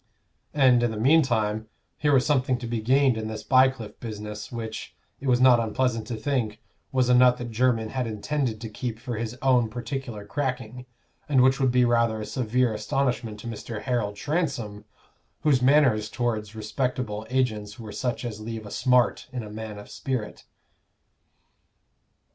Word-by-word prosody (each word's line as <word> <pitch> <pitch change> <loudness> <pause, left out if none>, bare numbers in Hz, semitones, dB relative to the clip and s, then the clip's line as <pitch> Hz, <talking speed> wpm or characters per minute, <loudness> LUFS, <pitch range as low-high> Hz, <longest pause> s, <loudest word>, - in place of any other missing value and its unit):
And, 130 -4 +5
in 120 - +2
the 110 - -5
meantime, 110 -5 +2 0.3
here 150 - +1
was 130 -2 +4
something 130 -3 +2
to 120 - -7
be 115 -1 -2
gained 130 0 +3
in 110 - -4
this 110 -1 -6
Bycliffe 130 -5 +2
business, 105 -2 -7
which, 110 -2 -6 0.2
it 140 - -6
was 125 -1 +4
not 125 -2 +6
unpleasant 115 0 -1
to 120 - -3
think, 110 -3 -1 0.3
was 130 -2 +2
a 125 - +4
nut 125 0 +6
that 120 -1 -6
Jermyn 115 -1 +1
had 130 -1 -2
intended 115 +2 -2
to 115 - -5
keep 115 +1 -4
for 120 +1 -5
his 115 +2 -4
own 125 -4 +4
particular 120 -2 -5
cracking, 125 +1 -4 0.4
and 130 -3 +5
which 130 +1 +4
would 135 -1 +3
be 125 0 +4
rather 115 -2 +2
a 105 - -4
severe 125 -1 0
astonishment 110 0 -1
to - - -8
Mr. 110 -1 -6
Harold 115 -5 -1
Transome, 125 - -2 0.6
whose 140 -5 +3
manners 125 -6 +4
towards 110 -3 -2
respectable 110 -1 -3
agents 110 -4 -1
were 110 -2 -8
such 125 +1 -3
as 110 -3 -5
leave 110 0 -6
a 105 - -9
smart 125 -1 +2
in 125 -3 -4
a 105 - -9
man 110 -1 -6
of 105 - -10
spirit. 125 -6 -4
120 Hz, 170 wpm, -26 LUFS, 110-130 Hz, 0.6 s, not